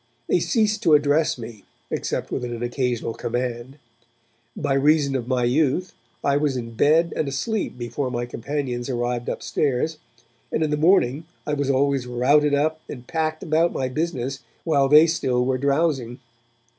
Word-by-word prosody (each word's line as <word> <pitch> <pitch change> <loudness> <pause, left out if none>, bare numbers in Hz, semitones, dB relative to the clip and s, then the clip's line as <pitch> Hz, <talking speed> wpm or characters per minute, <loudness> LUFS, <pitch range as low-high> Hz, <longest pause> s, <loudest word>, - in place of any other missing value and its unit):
They - - +3
ceased 215 -3 +1
to 160 -8 +5
address 145 +1 +2
me 115 -4 -9 0.3
except - - -3
with - - -2
an 120 -1 -4
occasional 120 -2 -1
command. 120 +3 -4 0.8
By 145 -2 0
reason 140 0 +3
of 120 -3 -2
my 125 -1 +1
youth, 145 +8 +1 0.3
I 140 0 +2
was 145 -3 0
in 115 -1 -5
bed 155 +8 +3
and 155 - -1
asleep 145 - -2
before 120 +3 -3
my 120 -1 -2
companions 125 0 -4
arrived 120 -1 -2
upstairs, 150 +3 -1 0.5
and 160 - 0
in 155 - -1
the - - +2
morning 155 -3 +3 0.2
I 150 - -2
was 145 -1 -1
always 135 -1 +1
routed 145 +4 +3
up 155 +2 0
and 125 -3 -8
packed 155 0 -2
about 165 +2 +2
my 130 -1 -2
business 135 -2 -2 0.2
while 140 -4 +2
they 150 +2 +8
still 130 -7 0
were 130 0 0
drowsing. 140 -4 0
140 Hz, 160 wpm, -23 LUFS, 125-155 Hz, 0.8 s, they